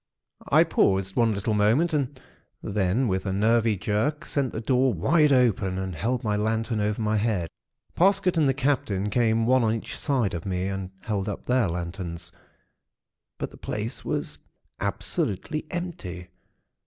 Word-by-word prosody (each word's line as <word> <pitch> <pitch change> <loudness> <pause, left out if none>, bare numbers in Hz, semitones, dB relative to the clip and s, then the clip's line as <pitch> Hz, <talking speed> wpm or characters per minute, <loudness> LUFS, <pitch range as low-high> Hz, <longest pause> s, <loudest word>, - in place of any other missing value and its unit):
"I - - +7
paused 95 0 +1
one 115 -2 +3
little 100 +2 -1
moment, 115 +12 +3
and 140 -2 -1 0.4
then 105 +5 +1
with 95 0 -1
a - - 0
nervy 110 +2 +2
jerk, 110 - -1
sent 135 -4 -1
the - - -4
door 130 +3 +2
wide 150 - +3
open, 110 -8 +2
and 95 -1 -3
held 115 +9 -1
my 105 -2 0
lantern 110 +1 0
over 105 +1 0
my 110 -1 +1
head. 105 -6 0 0.5
Parsket 190 0 +3
and 155 -4 +3
the - - +3
Captain 110 -8 0
came 115 -1 +2
one 130 +1 +4
on 110 0 +2
each 115 - -6
side 130 - 0
of 85 -1 -4
me, 90 -1 -2
and 95 -1 -4
held 105 -2 -2
up 100 - -6
their 125 -4 +2
lanterns; 85 0 -5 1.1
but - - -4
the - - -14
place 110 +4 -4
was - - -3 0.4
absolutely 105 - -2
empty. 100 - -5
110 Hz, 160 wpm, -26 LUFS, 95-130 Hz, 1.1 s, I